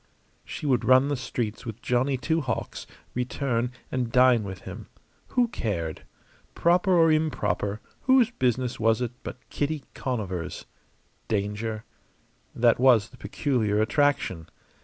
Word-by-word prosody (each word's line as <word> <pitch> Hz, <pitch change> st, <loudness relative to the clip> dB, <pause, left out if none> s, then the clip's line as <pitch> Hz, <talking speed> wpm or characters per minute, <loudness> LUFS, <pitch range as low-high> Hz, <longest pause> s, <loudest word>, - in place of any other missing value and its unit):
She -, -, -7 dB
would 130 Hz, -4 st, +2 dB
run 130 Hz, +2 st, +5 dB
the 145 Hz, -, +1 dB
streets 120 Hz, -4 st, -4 dB
with 115 Hz, -2 st, -7 dB
Johnny 130 Hz, +2 st, +1 dB
Two 160 Hz, +5 st, 0 dB
Hawks, 125 Hz, -5 st, -4 dB, 0.3 s
return, 125 Hz, -1 st, -1 dB, 0.2 s
and 125 Hz, -3 st, -1 dB
dine 125 Hz, -2 st, +5 dB
with 95 Hz, -3 st, -7 dB
him. -, -, -9 dB, 0.4 s
Who 245 Hz, -1 st, +2 dB
cared? 85 Hz, -, -3 dB, 0.5 s
Proper 180 Hz, +2 st, +3 dB
or 165 Hz, -1 st, +5 dB
improper, 125 Hz, -9 st, 0 dB, 0.2 s
whose 260 Hz, -3 st, +5 dB
business 125 Hz, -, -1 dB
was 115 Hz, 0 st, +3 dB
it 120 Hz, -2 st, -1 dB
but -, -, -7 dB
Kitty 145 Hz, 0 st, -2 dB
Conover's? 100 Hz, -10 st, -4 dB, 0.6 s
Danger? 110 Hz, +1 st, -2 dB, 0.7 s
That 120 Hz, -1 st, +3 dB
was 120 Hz, -5 st, +5 dB
the -, -, -16 dB
peculiar 110 Hz, -8 st, 0 dB
attraction. 110 Hz, -, +1 dB
125 Hz, 130 wpm, -26 LUFS, 110-145 Hz, 0.7 s, run